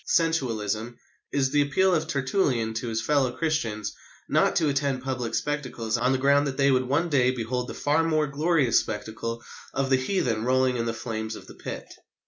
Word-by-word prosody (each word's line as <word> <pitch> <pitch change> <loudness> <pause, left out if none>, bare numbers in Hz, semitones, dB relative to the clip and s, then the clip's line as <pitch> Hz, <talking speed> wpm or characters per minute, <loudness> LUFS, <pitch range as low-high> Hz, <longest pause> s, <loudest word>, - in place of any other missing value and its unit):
sensualism, 120 -8 0 0.3
is 135 -2 +1
the 145 - +4
appeal 185 +7 +2
of 160 - +1
Tertullian 130 - 0
to 115 +2 -3
his 115 -1 -2
fellow 135 -1 +2
Christians 125 -11 -1 0.3
not - - +2
to 160 - +3
attend 140 -2 0
public 130 -3 -2
spectacles 125 -6 -2
on 125 +2 +2
the 130 - +2
ground 140 +2 +3
that 135 - -4
they 140 0 +4
would 130 -1 +2
one 145 +6 +1
day 130 -4 +3
behold 125 0 -2
the - - -7
far 150 +3 +2
more 155 -2 +2
glorious 150 -2 +2
spectacle 115 +2 -5 0.3
of 135 0 0
the 130 - +6
heathen 130 - 0
rolling 130 +1 +2
in 115 0 -1
the 115 - -1
flames 110 -1 -4
of - - -11
the - - -12
Pit. - - -7
130 Hz, 190 wpm, -26 LUFS, 115-145 Hz, 0.3 s, the